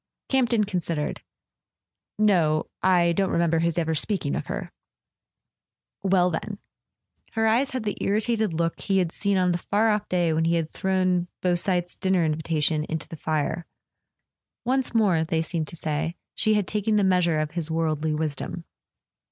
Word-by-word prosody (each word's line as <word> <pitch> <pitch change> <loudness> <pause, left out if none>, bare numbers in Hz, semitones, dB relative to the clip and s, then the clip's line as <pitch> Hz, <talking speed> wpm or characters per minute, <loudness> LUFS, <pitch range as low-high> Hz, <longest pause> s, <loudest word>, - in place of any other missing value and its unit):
Camp 260 -3 +2
ton 220 -2 +3
considered. 170 -6 -2 1.0
"No. 170 -8 +2
I 175 -2 +4
don't 190 +3 +1
remember 170 -1 +2
his 170 0 0
ever 160 -1 +1
speaking 160 -2 -1
of - - -4
her." - - -5 1.3
"Well, 185 -2 +3
then 200 +5 -4 0.4
" - - -40
Her 225 0 +1
eyes 235 +5 +3
had 255 -3 -3
the 210 -2 -2
irritated 215 0 +1
look 165 +1 -1
he 195 -1 +1
had 180 -3 +1
seen 200 +1 0
on 180 -1 +3
the 175 - -1
far 215 +5 +2
off 210 0 -1
day 175 -3 +2
when 160 +1 +1
he 170 +1 +2
had 160 -2 -1
thrown 185 -2 +1 0.2
Beausite's 180 0 +1
dinner 190 -3 +1
invitation 155 -1 0
into 160 -1 -3
the - - -8
fire. 155 +2 -2 1.0
Once 255 -1 0
more, 190 -8 +3
they 160 0 0
seemed 160 -2 -2
to - - -7
say, 160 +1 -2 0.2
she 215 -2 +2
had 205 -3 0
taken 210 +1 0
the 205 - +3
measure 180 -4 +3
of 155 0 -1
his 165 -1 -3
worldly 160 -1 0
wisdom. 155 +2 -3
175 Hz, 170 wpm, -25 LUFS, 160-200 Hz, 1.3 s, I